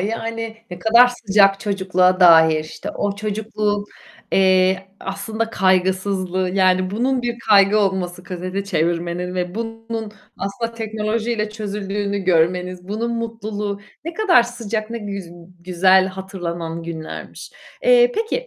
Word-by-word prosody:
yani, 225 +2 -4
ne 180 - -7
kadar 230 +6 +6
sıcak 200 -4 +3
çocukluğa 190 -2 +1
dair. 160 -3 +6
İşte, 155 - -7
o 200 -1 -2
çocukluğun, 210 0 -2 0.5
eee, 190 0 +3
aslında 220 +3 -4
kaygısızlığı, 185 -1 +1
yani 185 -1 +2
bunun 250 +5 0
bir 240 -1 -3
kaygı 200 0 +6
olması, 190 -3 -1
kaseti 185 +2 -5
çevirmenin 175 0 -1
ve 180 0 -3
bunun 225 -1 -5 0.3
aslında 200 +4 -3
teknolojiyle 220 0 -2
çözüldüğünü 205 -1 -3
görmeniz, 180 0 0
bunun 230 +3 -2
mutluluğu, 215 -3 -4 0.2
ne 335 +1 -5
kadar 380 - +5
sıcak, 230 -2 -4
ne 235 - -4
güz 200 -4 -6 0.3
güzel 185 +1 +4
hatırlanan 175 -3 -5
günlermiş. 165 -1 -8 0.3
Eee, - - +5
peki, 455 +3 -2
200 Hz, 120 wpm, -20 LUFS, 185-225 Hz, 0.5 s, kadar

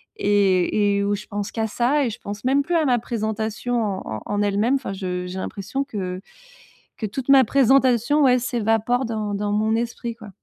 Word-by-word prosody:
et 200 0 +2
et 200 - 0
où 205 0 +1
je 210 - -8
pense 205 -1 -4
qu'à 220 -1 -1
ça 255 +6 +1
et - - 0
je 220 - -8
pense 205 +1 -7
même 275 +2 +3
plus 345 +4 -1
à 320 -2 +3
ma 245 -3 +3
présentation 220 +1 -2
en 195 -3 -2 0.2
en - - -9
en 205 0 -1
elle-même. 205 +5 +2
Enfin 260 -7 -3
je 180 -2 -4
j'ai 185 +1 -5
l'impression 205 +9 -4
que 185 -7 -5 0.8
que 220 - -3
toute 255 +6 -6
ma 270 -1 +8
présentation 265 +2 +3
ouais 255 -2 +5
s'évapore 240 +1 0
dans 215 -2 -3
dans 205 +1 -2
mon 220 +1 +1
esprit, 235 0 -3
quoi. 220 -2 -12
220 Hz, 200 wpm, -22 LUFS, 205-245 Hz, 0.8 s, ma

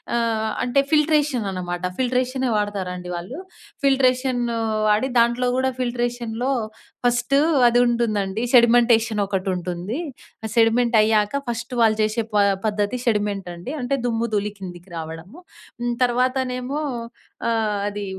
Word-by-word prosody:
ఆహ్, 225 -2 0 0.2
అంటే 250 +3 +2
ఫిల్ట్రేషన్ 300 -6 +2
అనమాట. 175 -1 -4 0.2
ఫిల్ట్రేషనే 255 0 0
వాడతారు 205 -3 -2
అండి 180 0 -7
వాళ్ళు. 185 - -7 0.5
ఫిల్ట్రేషన్నూ 255 -3 +2 0.3
వాడి, 210 +5 +2
దాంట్లో 240 +2 +2
గూడా 260 0 +2
ఫిల్ట్రేషన్‌లో 240 0 -2 0.5
ఫస్టూ 245 +3 +2 0.3
అదుంటుందండి. 235 -4 +2 0.3
సెడిమెంటేషన్ 235 -2 +5
ఒకటుంటుంది. 185 +1 -3 0.5
ఆ - - -2
సెడిమెంట్ 235 +1 +3
అయ్యాక 215 -1 +3 0.2
ఫస్ట్ 240 +2 -4
వాళ్ళు 220 -2 +4
చేసే 215 +2 +1
పా 205 - +4 0.2
పద్ధతి 210 +2 0
సెడిమెంట్ 205 -4 0
అండి. 175 +9 -7
అంటే, 250 +1 -2
దుమ్ము-ధూళి 225 -3 -1
కిందికి 180 -1 -10
రావడము. 165 - -8 0.4
హ్మ్. 240 0 0
తర్వాతనేమో, 255 +2 0 0.7
ఆహ్, 220 -3 0
అదీ 205 0 -4
235 Hz, 115 wpm, -22 LUFS, 205-250 Hz, 0.7 s, సెడిమెంటేషన్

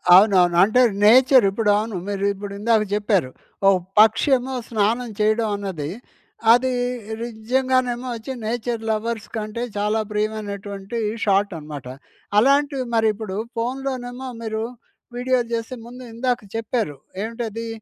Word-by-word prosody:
అవునవును. 185 -3 +5
అంటే 220 +5 +4 0.2
నేచర్ 255 +2 +7
ఇప్పుడవును 210 0 +1
మీరు 200 -1 -2
ఇప్పుడు 200 0 -7
ఇందాక 220 0 +3
చెప్పారు. 205 - +1 0.4
ఓ - - +7 0.3
పక్షి 220 +6 +5
ఏమో 260 +2 -6 0.2
స్నానం 230 +2 0
చేయడం 215 +1 +2
అన్నది 185 -7 -4 0.6
అది 255 +1 +2 0.5
నిజంగానేమో 250 +2 0
ఒచ్చి 245 +4 -6
నేచర్ 230 0 -2
లవర్స్ 220 0 -2
కంటే 215 +2 -3
చాలా 210 +2 +1
ప్రియమైనటువంటి 205 0 -4 0.3
షాట్ 200 0 +2
అనమాట. 150 -4 -8 0.5
అలాంటివి 275 +2 +3
మరి 225 -1 +3
ఇప్పుడు 205 -2 -6 0.2
ఫోన్‌లోనేమో 255 +1 -3
మీరు 220 -1 -3 0.5
వీడియో 255 +1 +1
చేస్తే 230 +2 -3
ముందు 250 +2 -10
ఇందాక 245 +1 0 0.2
చెప్పారు. 225 - -2 0.3
ఏంటది 230 0 -4
225 Hz, 120 wpm, -22 LUFS, 205-245 Hz, 0.6 s, నేచర్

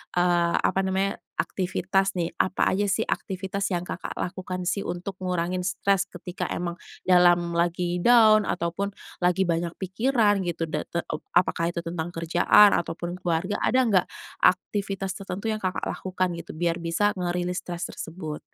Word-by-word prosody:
eee, 175 -1 +3
apa - - +1
namanya, 190 +1 0 0.2
aktivitas 195 +1 0
nih, 170 -2 -1
apa 185 - +1
aja 205 +2 +1
sih 205 +3 +1
aktivitas 195 -1 -3
yang 175 -2 -1
Kakak - - -6
lakukan 185 0 -4
sih 200 +3 -1
untuk 180 +2 -5
ngurangin 180 0 -1
stres 195 0 +1
ketika 180 0 -6
emang 175 0 -4 0.2
dalam 175 -1 +4
lagi 175 +1 0
down 215 0 +6
ataupun 180 +4 -2 0.2
lagi 180 +1 +2
banyak 170 0 0
pikiran 205 +2 +2
gitu? 170 -1 -2
Dan 155 -1 -4
teup 170 -3 -3 0.2
apakah 170 -1 +2
itu 170 - -3
tentang 165 -1 -3
kerjaan 175 +5 +5
ataupun 170 +1 -4
keluarga, 175 +3 -1
ada 260 0 +3
enggak 200 -6 +3 0.3
aktivitas 195 +1 +1
tertentu 195 +1 -6
yang 215 - -2
Kakak 185 -1 -2
lakukan 185 -1 -2
gitu, 170 - -10
biar 170 +1 0
bisa 170 +5 +1
nge-release 180 0 -1
stres 175 0 -4
tersebut? 160 -2 -6
180 Hz, 150 wpm, -26 LUFS, 175-195 Hz, 0.3 s, down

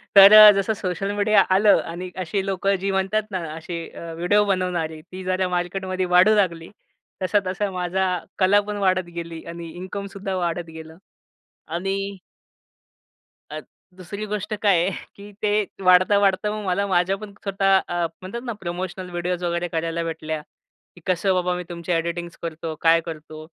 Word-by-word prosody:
तर 195 +1 +10
अ, 215 0 +11
जसं 200 +2 0
social 195 -1 -3
media 205 0 +4
आलं 205 +1 +5
आणि 180 +2 -6
अशी 195 +3 -2
लोकं 195 +1 0
जी 195 - 0
म्हणतात 195 +3 0
ना 185 - -2 0.2
असे 165 +1 -6
अ, 165 -1 -8
व्हिडिओ 205 +5 +2
बनवणारे 180 -5 -1
ती 185 +3 -10
जरा 185 0 0
मार्केटमध्ये 185 +1 -2
वाढू 210 +4 +6
लागली. 170 -5 0 0.5
तसा, 205 +3 +3
तसा 195 +2 -1
माझा 180 +1 -1 0.4
कला 195 +2 +5
पण 210 0 -3
वाढत 185 -2 +1
गेली 170 -1 -6
आणि 170 0 -7
इन्कमसुद्धा 195 +1 -5
वाढत 175 -1 -2
गेलं 160 0 -11 0.7
आणि 185 +4 -2 1.5
अत - - -7 0.3
दुसरी 200 +4 -6
गोष्ट 210 +1 -3
काय 200 -4 +4
आहे, 190 - 0 0.2
की 205 +1 -12
ते 210 -1 +2 0.2
वाढता, 185 +2 +5
वाढता 200 +1 +2
मग 210 -1 -5
मला 190 +2 0
माझ्या 185 0 +2
पण 210 0 -9
स्वतः 195 -1 +3
अ, 175 -1 -1 0.2
म्हणतात 195 +6 -6
ना 235 - -3
प्रमोशनल 180 +1 -5
व्हिडिओज 175 +1 -3
वगैरे 170 0 -1
करायला 165 0 -2
भेटल्या, 160 -1 -4 0.5
की 175 - -16
कसं 185 +1 +2
बाबा 180 -1 0
मी 180 - -4
तुमची 170 0 -5
एडिटिंग्स 170 0 -2
करतो 165 -1 -5
काय 165 0 +5
करतो 155 -1 -8
185 Hz, 165 wpm, -23 LUFS, 170-195 Hz, 1.5 s, अ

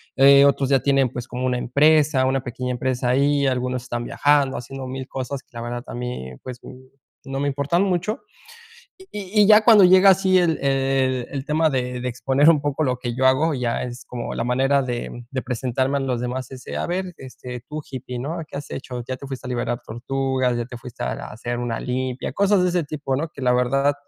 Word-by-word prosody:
Eh, 140 +1 +7
otros 140 -1 +2
ya 135 -1 +4
tienen, 135 0 +2
pues, 125 0 -6
como 125 +1 -4
una 125 -1 +1
empresa, 145 +2 +3
una 130 0 +1
pequeña 125 +1 -4
empresa 125 0 -1
ahí, 140 +2 +2
algunos 125 -1 -1
están 120 0 -4
viajando, 145 -2 +2
haciendo 130 +1 -7
1000 130 0 -6
cosas 130 +1 -5
que, - - -42
la 115 - -6
verdad, 120 +1 -5
a - - -7
mí, 125 - -5
pues, 125 -1 -7 0.7
no 135 0 -4
me 145 - 0
importan 140 +6 0
mucho. 195 +6 -1 0.8
Y 380 - -15
y 210 +1 -1
y - - +5
ya 215 0 +7
cuando 220 -4 +8
llega 185 +2 +7
así 190 0 +4
el 170 -3 +2
el 135 -2 +1
el 135 -2 -4
tema 155 +1 +2
de 125 -1 -2
de 125 - -1
exponer 135 +5 +3
un 155 -3 +3
poco 145 +1 -1
lo 125 -2 0
que 120 -2 -4
yo 130 - 0
hago, 150 +5 +3
ya 125 -3 -1
es 125 0 -7
como 120 -1 -5
la 115 - -2
manera 135 +3 +2
de 120 -1 -5
de 130 -1 -3
presentarme 130 +2 -1
a - - -3
los 130 -3 -1
demás, 125 0 -4
ese: 130 -1 -8
"A - - -2
ver, 180 0 -3
este, 125 -2 -9
tú 150 0 -5
hippie, 125 -1 -6
¿no? 150 +7 -4
¿Qué - - -9
has 145 - -9
hecho? 125 -2 -6
¿Ya 130 - -2
te 135 +2 -10
fuiste 135 -1 -7
a - - -5
liberar 120 -1 -2
tortugas? 130 +2 -1
¿Ya 120 - -3
te 120 0 -9
fuiste 120 0 -9
a - - -1
a - - -7
hacer 120 +2 -4
una 120 -2 -3
limpia?" 125 0 -3
Cosas 200 -1 +3
de 180 - +3
ese 175 -2 0
tipo, 140 -2 -3
¿no? 160 +4 -2
Que 140 - -11
la 125 -1 +3
verdad, 135 +3 +2
130 Hz, 225 wpm, -22 LUFS, 125-145 Hz, 0.8 s, cuando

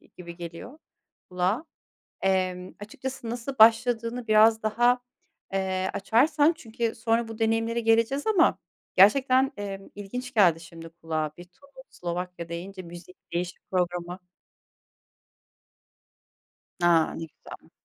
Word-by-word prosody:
gi - - -25
gibi 170 -1 -10
geliyor 175 - -9 0.5
kulağa. 185 - -1 0.6
Emm, 185 -1 0
açıkçası 245 +3 -6
nasıl 245 +3 -5
başladığını 230 +1 +4
biraz 220 +1 +5
daha, 240 +3 +2 0.5
eee, 190 -1 -1
açarsan 290 - +3
çünkü 230 -4 -3
sonra 225 0 0
bu 225 0 -8
deneyimlere 225 +1 +1
geleceğiz 230 +5 +2
ama 400 -6 +3 0.4
gerçekten, 260 +7 +5
emm, 195 -1 -7
ilginç 250 +6 -7
geldi 175 -6 +4
şimdi 165 0 -11
kulağa. 160 -2 -4
Bir 175 - -9
Tunus, 265 +9 -18
Slovakya 175 0 -5
deyince, 185 +3 -7
müzik 175 +1 -12 0.2
değişim 175 0 -3
programı. 180 0 -2 2.6
A! 170 -2 +3
Ne 165 - -5
güzel. 155 - -14
205 Hz, 115 wpm, -26 LUFS, 180-235 Hz, 2.6 s, biraz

